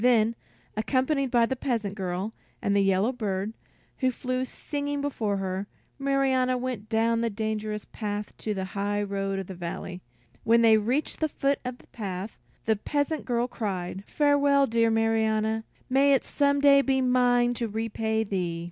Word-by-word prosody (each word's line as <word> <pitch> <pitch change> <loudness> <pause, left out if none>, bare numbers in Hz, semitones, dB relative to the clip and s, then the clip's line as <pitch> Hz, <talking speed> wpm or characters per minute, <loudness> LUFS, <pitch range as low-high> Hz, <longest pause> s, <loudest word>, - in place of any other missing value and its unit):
Then, 230 -2 +4 0.4
accompanied 265 +5 +1
by 235 -1 +4
the 265 - -2
peasant 230 -6 -2
girl 190 +1 -3 0.3
and 200 - 0
the 200 - +4
yellow 195 +4 +3
bird, 210 -3 -2 0.5
who 260 - +3
flew 255 +1 -2
singing 285 +2 -4
before 225 -8 -1
her, 190 +1 -3 0.3
Marianna 265 -2 +2
went 245 -4 -4
down 230 +1 +2
the 230 - +1
dangerous 215 0 -3
path 210 -1 -5
to 215 -1 -3
the 190 -1 -2
high 205 +2 -1
road 195 -1 -2
in 195 - -3
the 190 - -7
valley. 180 +1 -6 0.4
When 230 +1 +4
they 225 -1 +7
reached 245 +8 -1
the 315 - +1
foot 280 0 0
of 250 -1 -4
the - - -20
path, 195 -1 -5 0.3
the 220 -1 +2
peasant 290 +6 -1
girl 240 -1 +1
cried: 190 -5 -4
"Farewell, 285 -1 +4
dear 230 -1 +2
Marianna; 220 0 +1 0.2
may 275 +2 +4
it 270 - +3
some 285 -1 +1
day 280 -1 +7
be 270 -1 +1
mine 245 -1 +3
to 235 -1 -2
repay 220 0 -1
thee!" 180 -5 -2
225 Hz, 165 wpm, -27 LUFS, 205-260 Hz, 0.5 s, they